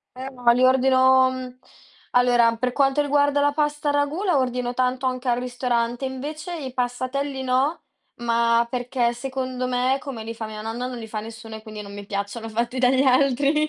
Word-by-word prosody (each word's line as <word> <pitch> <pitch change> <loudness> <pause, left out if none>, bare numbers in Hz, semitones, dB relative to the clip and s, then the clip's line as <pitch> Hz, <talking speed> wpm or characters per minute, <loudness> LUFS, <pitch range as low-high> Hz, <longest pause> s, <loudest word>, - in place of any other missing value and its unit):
Eh 260 +1 -6
no, 245 -2 +3
li 250 - +2
ordino 260 0 +5
mhmm, 255 -1 -7 0.5
allora, 240 -2 +4
per 250 +1 -1
quanto 275 +1 +2
riguarda 285 0 +2
la 290 0 +3
pasta 295 0 -1
a - - +3
ragù, 290 +6 0
la 360 -8 +2
ordino 250 -1 -1
tanto 255 +1 0
anche 255 0 -2
al 240 - +2
ristorante. 245 0 -1
Invece 300 +7 -5
i 265 -5 -6
passatelli 255 +2 -2
no, 260 +5 +1 0.3
ma 235 0 +2
perché 245 -1 0
secondo 255 0 -4
me, 255 +1 +1
come 265 -7 -7
li 225 +1 -5
fa 225 -1 -6
mia 215 0 -7
nonna, 235 +3 -3
non 250 -1 -6
li 225 -1 -7
fa 215 -1 -4
nessuno 225 0 -9
e 220 - -9
quindi 215 -1 -8
non 200 0 -10
mi 205 0 -9
piacciono 205 +3 -4
fatti 235 +3 -2
dagli 260 +1 +4
altri. 275 +3 +3
255 Hz, 195 wpm, -23 LUFS, 235-270 Hz, 0.5 s, ordino